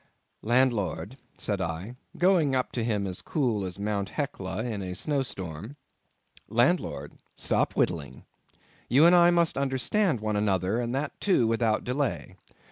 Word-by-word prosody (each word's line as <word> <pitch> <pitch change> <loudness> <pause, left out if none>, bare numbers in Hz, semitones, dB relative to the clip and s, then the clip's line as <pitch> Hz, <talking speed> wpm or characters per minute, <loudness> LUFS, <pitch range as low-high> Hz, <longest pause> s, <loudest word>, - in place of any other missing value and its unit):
"Landlord," 120 -1 +1 0.2
said 100 -2 -2
I, 90 +7 -4 0.2
going 175 -7 +3
up 130 - 0
to 120 - -2
him 105 -3 0
as 90 -1 -4
cool 120 -9 0
as 90 -1 -5
Mt. 100 -1 -2
Hecla 110 -9 -4
in 110 -5 -3
a 90 -1 -5
snow 145 +7 0
storm—"landlord, 105 - -3 0.2
stop - - +1
whittling. - - -1 0.6
You 140 +7 +6
and 175 +1 +7
I 175 0 +7
must 170 -4 +2
understand 140 - +1
one 105 0 -2
another, 100 +1 +1
and 120 +1 -2
that 140 +2 -4
too 185 - +3
without 115 -1 +1
delay. 135 +2 -2
120 Hz, 140 wpm, -27 LUFS, 100-140 Hz, 0.6 s, and